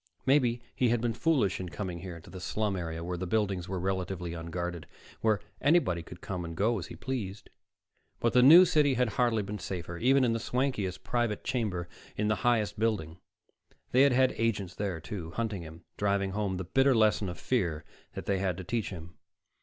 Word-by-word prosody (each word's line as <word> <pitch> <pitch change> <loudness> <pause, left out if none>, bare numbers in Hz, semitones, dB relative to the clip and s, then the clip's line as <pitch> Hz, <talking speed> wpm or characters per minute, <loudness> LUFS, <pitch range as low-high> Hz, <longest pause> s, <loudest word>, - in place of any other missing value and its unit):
Maybe 125 -4 +3
he 125 - +2
had 120 0 +2
been 115 0 0
foolish 130 - +1
in 90 -1 -5
coming 85 +2 -5
here 85 -2 -7
to - - -14
the 95 - -8
slum 105 +2 -1
area, 85 -2 -4
where 90 0 -4
the 95 - -3
buildings 95 -3 0
were 95 -1 -2
relatively 90 -2 -2
unguarded, 85 +1 -5 0.3
where 110 -2 +2 0.2
anybody 145 - +3
could 85 +2 -12
come 90 -2 -4
and 85 -1 -7
go 110 +3 +2
as 90 - -6
he - - -9
pleased. 110 -7 -5 0.7
But 115 - +1
the 125 - +6
New 165 +8 +10
City 150 -5 +3
had 125 -1 +2
hardly 115 -1 +1
been 105 +1 -5
safer, 85 -3 -5
even 135 +2 +4
in 120 -2 +2
the 115 - -1
swankiest 125 -8 -1
private 120 -4 -1
chamber 100 -9 -2 0.3
in 105 0 +1
the 105 - +1
highest 110 -4 +1
building. 95 -7 -1 0.7
They 130 - +5
had 140 0 +6
had 130 +1 +4
agents 105 -5 0
there, 95 -5 -3
too, 80 0 -7
hunting 110 -5 -2
him, 80 +1 -11
driving 100 -1 +1
home 100 -2 -1
the 95 - -3
bitter 135 +8 +3
lesson 110 -3 +3
of 90 - -6
fear 90 -12 -1 0.3
they 100 -1 -1
had 95 -3 -1
to 95 - -6
teach 115 +4 -2
him. 85 -2 -10
100 Hz, 200 wpm, -30 LUFS, 90-120 Hz, 0.7 s, New